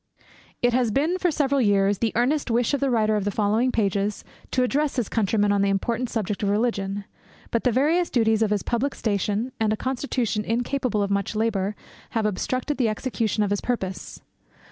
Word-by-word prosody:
It 245 Hz, 0 st, +3 dB
has 245 Hz, -2 st, +2 dB
been, 310 Hz, -, +1 dB
for 360 Hz, -, +2 dB
several 280 Hz, -3 st, +1 dB
years, 200 Hz, -2 st, +3 dB
the 225 Hz, -2 st, +1 dB
earnest 270 Hz, +5 st, +1 dB
wish 235 Hz, +3 st, +1 dB
of 285 Hz, -, +1 dB
the 275 Hz, -, +1 dB
writer 215 Hz, -3 st, +2 dB
of 210 Hz, -, 0 dB
the 205 Hz, -, 0 dB
following 215 Hz, +5 st, +1 dB
pages 205 Hz, -2 st, 0 dB, 0.3 s
to 255 Hz, -, +1 dB
address 285 Hz, +3 st, 0 dB
his 245 Hz, -6 st, 0 dB
countrymen 205 Hz, -1 st, +1 dB
on 200 Hz, -1 st, +2 dB
the 200 Hz, -, +2 dB
important 230 Hz, +5 st, -1 dB
subject 210 Hz, -3 st, -2 dB
of 200 Hz, -, +1 dB
Religion; 205 Hz, -2 st, -1 dB, 0.5 s
but 230 Hz, -, 0 dB
the 250 Hz, -, +4 dB
various 310 Hz, +8 st, +2 dB
duties 225 Hz, -3 st, +2 dB
of 220 Hz, -, +3 dB
his 205 Hz, -2 st, 0 dB
public 255 Hz, +4 st, -1 dB
station, 210 Hz, +3 st, -1 dB
and 220 Hz, -1 st, +2 dB
a 215 Hz, -, 0 dB
constitution 245 Hz, -5 st, -1 dB
incapable 240 Hz, -1 st, 0 dB
of 200 Hz, -, -2 dB
much 200 Hz, +2 st, -1 dB
labour, 210 Hz, -2 st, 0 dB, 0.4 s
have 220 Hz, -, +1 dB
obstructed 255 Hz, +8 st, -1 dB
the 235 Hz, -4 st, +3 dB
execution 215 Hz, -1 st, -1 dB
of 205 Hz, -, -1 dB
his 205 Hz, -, 0 dB
purpose. 190 Hz, -7 st, -4 dB
225 Hz, 195 wpm, -24 LUFS, 205-255 Hz, 0.5 s, the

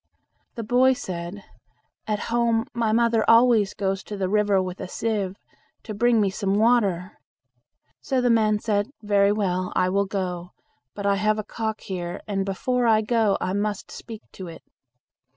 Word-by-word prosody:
The 230 Hz, -, -4 dB
boy 250 Hz, +4 st, +4 dB
said, 180 Hz, -2 st, -6 dB, 0.6 s
"At 210 Hz, -1 st, -1 dB
home 235 Hz, -1 st, +2 dB
my 230 Hz, -2 st, 0 dB
mother 230 Hz, 0 st, +3 dB
always 230 Hz, -4 st, +5 dB
goes 195 Hz, -1 st, -2 dB
to 205 Hz, -, -6 dB
the 190 Hz, -1 st, -1 dB
river 205 Hz, 0 st, +2 dB
with 185 Hz, 0 st, -4 dB
a -, -, -5 dB
sieve 200 Hz, -2 st, -2 dB, 0.5 s
to 215 Hz, -, -6 dB
bring 235 Hz, +2 st, +3 dB
me 200 Hz, -2 st, +2 dB
some 195 Hz, 0 st, -1 dB
water." 205 Hz, -5 st, +1 dB, 0.8 s
So 265 Hz, -2 st, 0 dB
the 245 Hz, -1 st, +2 dB
man 215 Hz, -2 st, +3 dB
said 205 Hz, 0 st, -1 dB
"Very 200 Hz, -1 st, +3 dB
well, 185 Hz, -3 st, -1 dB
I 185 Hz, 0 st, +2 dB
will 200 Hz, +1 st, +1 dB
go, 180 Hz, -3 st, -4 dB, 0.4 s
but 200 Hz, -, -5 dB
I 200 Hz, 0 st, +2 dB
have 215 Hz, +2 st, +1 dB
a 215 Hz, -, -3 dB
cock 220 Hz, 0 st, -4 dB
here, 175 Hz, -2 st, -5 dB
and 195 Hz, -2 st, -2 dB
before 245 Hz, +5 st, 0 dB
I 220 Hz, -1 st, +4 dB
go, 220 Hz, -2 st, +1 dB
I 185 Hz, -, -2 dB
must 205 Hz, 0 st, -2 dB
speak 225 Hz, -2 st, -9 dB
to 185 Hz, -, -9 dB
it." 165 Hz, -, -11 dB
205 Hz, 170 wpm, -24 LUFS, 195-225 Hz, 0.8 s, always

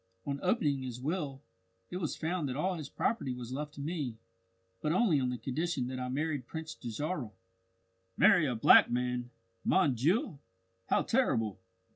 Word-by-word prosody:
On 140 Hz, 0 st, -2 dB
opening 150 Hz, -, +1 dB
his 125 Hz, -2 st, -5 dB
will, 145 Hz, -1 st, -3 dB, 0.5 s
it 180 Hz, -, -3 dB
was 165 Hz, -5 st, -2 dB
found 160 Hz, -3 st, -1 dB
that 125 Hz, -, -3 dB
all 185 Hz, +6 st, 0 dB
his 155 Hz, -5 st, -6 dB
property 140 Hz, -, -1 dB
was 125 Hz, 0 st, -6 dB
left 150 Hz, +2 st, -5 dB
to 140 Hz, -, -7 dB
me 145 Hz, -7 st, -3 dB, 0.6 s
but 150 Hz, -, 0 dB
only 180 Hz, -4 st, +3 dB
on 130 Hz, -1 st, 0 dB
the 125 Hz, -, -2 dB
condition 135 Hz, +4 st, -2 dB
that 130 Hz, 0 st, -4 dB
I 125 Hz, 0 st, -3 dB
married 145 Hz, -1 st, -2 dB
Prince 160 Hz, -1 st, -6 dB
Dajarah." 140 Hz, +2 st, -4 dB, 0.9 s
"Marry 165 Hz, -4 st, +6 dB
a 125 Hz, -, -1 dB
black 110 Hz, -, +7 dB
man! 125 Hz, 0 st, -1 dB, 0.3 s
Mon 185 Hz, -8 st, +3 dB
Dieu, 155 Hz, -, +1 dB, 0.5 s
how -, -, +3 dB
terrible!" 115 Hz, -, +1 dB
145 Hz, 165 wpm, -32 LUFS, 125-165 Hz, 0.9 s, black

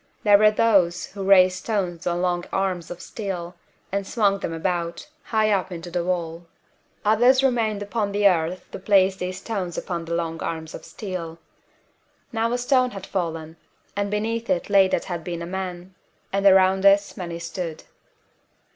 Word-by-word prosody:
There 205 Hz, -1 st, +6 dB
were 215 Hz, 0 st, +7 dB
those 195 Hz, -5 st, +2 dB
who 195 Hz, -1 st, -6 dB
raised 185 Hz, -1 st, +5 dB
stones 185 Hz, -5 st, -2 dB
on 175 Hz, +1 st, 0 dB
long 175 Hz, -1 st, 0 dB
arms 185 Hz, -3 st, -1 dB
of 175 Hz, -, -8 dB
steel, 185 Hz, -5 st, -5 dB, 0.4 s
and 200 Hz, 0 st, -2 dB
swung 200 Hz, -3 st, +1 dB
them -, -, -4 dB
about, 170 Hz, 0 st, -3 dB, 0.2 s
high 215 Hz, -1 st, +1 dB
up 190 Hz, -2 st, 0 dB
into 175 Hz, 0 st, -7 dB
the 175 Hz, 0 st, -1 dB
wall. 170 Hz, -1 st, -3 dB, 0.6 s
Others 245 Hz, +5 st, +5 dB
remained 225 Hz, -6 st, +1 dB
upon 205 Hz, 0 st, -2 dB
the 205 Hz, 0 st, +4 dB
earth 175 Hz, -1 st, 0 dB
to -, -, -7 dB
place 190 Hz, -1 st, +3 dB
these 185 Hz, 0 st, -4 dB
stones 190 Hz, -4 st, -4 dB
upon 170 Hz, -2 st, -4 dB
the 170 Hz, 0 st, -2 dB
long 165 Hz, -1 st, -3 dB
arms 160 Hz, -1 st, -4 dB
of -, -, -9 dB
steel. 175 Hz, -5 st, -6 dB, 1.0 s
Now 230 Hz, 0 st, 0 dB
a 245 Hz, -, +1 dB
stone 255 Hz, 0 st, +2 dB
had 195 Hz, -5 st, -8 dB
fallen, 165 Hz, -4 st, -4 dB, 0.4 s
and 200 Hz, 0 st, -1 dB
beneath 225 Hz, +3 st, -2 dB
it 180 Hz, +3 st, 0 dB
lay 195 Hz, -2 st, +6 dB
what -, -, 0 dB
had 175 Hz, -3 st, -5 dB
been 170 Hz, 0 st, -4 dB
a -, -, -4 dB
man; 180 Hz, 0 st, -5 dB, 0.4 s
and 195 Hz, 0 st, +3 dB
around 190 Hz, 0 st, +5 dB
this 200 Hz, 0 st, +4 dB
many 170 Hz, -2 st, -5 dB
stood. 170 Hz, -1 st, -5 dB
190 Hz, 175 wpm, -24 LUFS, 175-205 Hz, 1.0 s, were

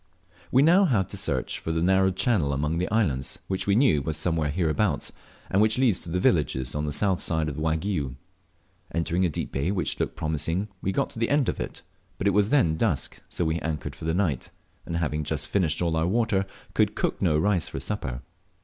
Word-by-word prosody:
We 130 Hz, +2 st, +5 dB
now 180 Hz, +6 st, +6 dB
had 110 Hz, -, +1 dB
to -, -, -5 dB
search -, -, -1 dB
for 80 Hz, -, -3 dB
the 80 Hz, 0 st, 0 dB
narrow 95 Hz, +1 st, +4 dB
channel 95 Hz, -, +1 dB
among 75 Hz, +5 st, -1 dB
islands, 75 Hz, -, 0 dB
which 95 Hz, 0 st, -2 dB
we 100 Hz, -, +4 dB
knew 110 Hz, -, +4 dB
was 75 Hz, +2 st, -3 dB
somewhere 80 Hz, -2 st, 0 dB
hereabouts, 80 Hz, +1 st, 0 dB, 0.4 s
and 95 Hz, -, +2 dB
which 110 Hz, +2 st, +3 dB
leads 125 Hz, -8 st, +3 dB
to 85 Hz, -, -7 dB
the 90 Hz, +2 st, 0 dB
villages 70 Hz, -8 st, +1 dB
on 75 Hz, 0 st, -2 dB
the -, -, -1 dB
south 95 Hz, +4 st, +1 dB
side 80 Hz, -2 st, +1 dB
of 75 Hz, 0 st, -4 dB
Waigiou. 80 Hz, -3 st, -1 dB, 0.8 s
Entering 85 Hz, +2 st, +1 dB
a -, -, +2 dB
deep 75 Hz, -, -4 dB
bay 70 Hz, +6 st, -1 dB
which 95 Hz, -5 st, 0 dB
looked -, -, -1 dB
promising, 80 Hz, +6 st, -1 dB
we 95 Hz, -, 0 dB
got -, -, -1 dB
to -, -, -5 dB
the 115 Hz, -, +1 dB
end 145 Hz, -3 st, +2 dB
of -, -, -3 dB
it, -, -, -6 dB, 0.3 s
but -, -, -4 dB
it 100 Hz, -, +4 dB
was 105 Hz, +1 st, +3 dB
then 105 Hz, -, +3 dB
dusk, 80 Hz, -, -1 dB
so 85 Hz, -, -2 dB
we 80 Hz, +1 st, 0 dB
anchored 75 Hz, -5 st, -4 dB
for -, -, -9 dB
the 80 Hz, +1 st, 0 dB
night, 85 Hz, -10 st, 0 dB, 0.4 s
and 85 Hz, -, -2 dB
having 75 Hz, -2 st, -1 dB
just 75 Hz, 0 st, -3 dB
finished 90 Hz, -4 st, +1 dB
all 85 Hz, -2 st, +1 dB
our 80 Hz, +1 st, +1 dB
water 105 Hz, -2 st, +1 dB, 0.3 s
could -, -, +2 dB
cook -, -, -1 dB
no 80 Hz, -5 st, +3 dB
rice 90 Hz, 0 st, +2 dB
for -, -, -5 dB
supper. 65 Hz, -6 st, -4 dB
85 Hz, 215 wpm, -26 LUFS, 75-100 Hz, 0.8 s, now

